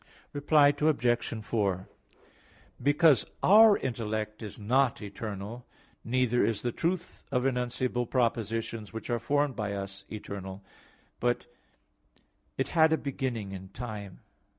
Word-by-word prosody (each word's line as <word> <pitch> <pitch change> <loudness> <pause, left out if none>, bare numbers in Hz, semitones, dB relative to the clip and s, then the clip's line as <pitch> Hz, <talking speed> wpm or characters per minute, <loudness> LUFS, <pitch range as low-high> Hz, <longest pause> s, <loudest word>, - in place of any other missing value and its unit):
Reply 145 0 +5
Obj. 120 -6 +1
4: 100 -4 0 0.9
Because 145 -1 +5 0.2
our 215 +1 +8
intellect 110 -3 -3
is 105 -3 -7
not 125 +4 +2
eternal, 105 +2 -6 0.4
neither 125 0 +2
is 110 -3 0
the 120 - 0
truth 175 +6 -3
of 125 -2 +1
enunciable 125 -1 0
propositions 115 -3 -1
which 110 +2 -5
are 120 - +1
formed 145 +2 +1
by 105 -3 -2
us, 100 0 -6
eternal, 100 -2 -7 0.6
but - - 0 1.1
it 135 - -1
had 160 -1 +4
a 160 - +4
beginning 125 -8 -3
in 95 -1 -8
time. 105 -3 -7
120 Hz, 120 wpm, -29 LUFS, 105-135 Hz, 1.1 s, our